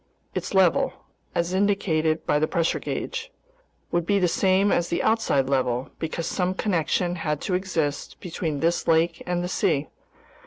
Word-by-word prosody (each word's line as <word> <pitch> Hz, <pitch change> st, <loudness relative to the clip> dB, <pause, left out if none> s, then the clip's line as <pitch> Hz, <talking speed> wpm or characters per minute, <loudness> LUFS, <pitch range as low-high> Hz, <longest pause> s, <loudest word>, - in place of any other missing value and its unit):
Its -, -, -3 dB
level—as 175 Hz, -1 st, 0 dB
indicated 175 Hz, -5 st, +1 dB
by 150 Hz, -, +2 dB
the 155 Hz, -, +2 dB
pressure 170 Hz, -3 st, 0 dB
gauge—would -, -, -5 dB
be 200 Hz, +4 st, +2 dB
the 185 Hz, -2 st, +3 dB
same 190 Hz, +3 st, +3 dB
as 175 Hz, -, +2 dB
the 170 Hz, -, 0 dB
outside 220 Hz, -12 st, +2 dB
level, 130 Hz, -2 st, 0 dB
because 165 Hz, +1 st, -3 dB
some 185 Hz, +2 st, -1 dB
connection 175 Hz, -2 st, 0 dB
had 150 Hz, -3 st, -1 dB
to 185 Hz, -, -3 dB
exist 170 Hz, -6 st, -2 dB
between 160 Hz, -4 st, -3 dB
this 170 Hz, +1 st, +1 dB
lake 165 Hz, +1 st, +2 dB
and 175 Hz, 0 st, 0 dB
the -, -, -1 dB
sea. 145 Hz, -5 st, 0 dB
175 Hz, 150 wpm, -25 LUFS, 160-190 Hz, -, the